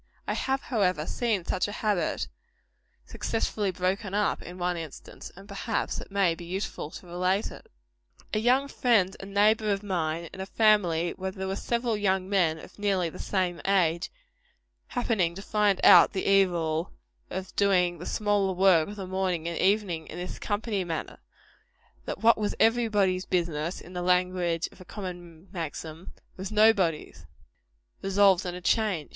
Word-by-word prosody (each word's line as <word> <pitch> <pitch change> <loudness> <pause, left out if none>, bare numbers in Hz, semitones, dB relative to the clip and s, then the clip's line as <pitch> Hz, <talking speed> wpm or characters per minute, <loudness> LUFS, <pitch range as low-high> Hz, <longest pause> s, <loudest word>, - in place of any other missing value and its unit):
I - - 0
have, 265 +1 -1
however, 185 - 0
seen 215 -3 -1
such 185 - 0
a - - -5
habit 210 -4 -1 0.8
successfully 215 -2 -2
broken 190 +2 -2
up; 210 0 +1
in 180 +1 -9
one 180 0 -1
instance; 160 -4 -9
and 195 +2 -13
perhaps 200 -1 -2
it - - -11
may 195 -3 +2
be 170 - -9
useful 180 -3 -4
to 180 - -11
relate 180 +4 0
it. - - -13 0.6
A 215 - +2
young 255 +5 +3
friend 220 -9 +2
and 195 0 -9
neighbor 215 +1 +3
of 200 0 -1
mine, 170 -4 -2
in 190 - -7
a 190 - -5
family 180 -7 +3
where 190 0 -4
there 190 0 -5
were 190 - -2
several 235 +1 -1
young 190 -2 0
men 180 -5 +2
of 185 - -13
nearly 190 -5 0
the - - -11
same 185 -3 -1
age, 175 -4 +1 0.8
happening 215 -9 0
to 195 - -7
find 210 -2 +2
out - - +8
the 190 - -2
evil 175 -4 +2 0.4
of 190 +1 -6
doing 180 -4 +2
the 175 - -7
smaller 205 -3 +1
work 180 -4 +4
of 205 - -7
the 195 -2 -6
morning 185 -3 -1
and 170 - -3
evening 190 -5 +1
in - - -8
this 180 +1 -6
company 205 -1 -2
manner 165 -3 -5 0.9
that - - -5
what 230 -1 +6
was 210 -1 -1
"every 230 +1 +4
body's 190 -4 +1
business," 170 -2 -1
in 180 - -13
the 180 - -3
language 180 -2 +1
of - - -17
a - - -9
common 175 -3 -8
maxim, 165 -1 -6 0.3
"was 190 +2 -5
nobody's" 210 -7 +2 0.7
resolved 195 -1 +3
on 175 - -4
a 180 - -7
change. 195 -6 +1
190 Hz, 170 wpm, -27 LUFS, 175-205 Hz, 0.9 s, out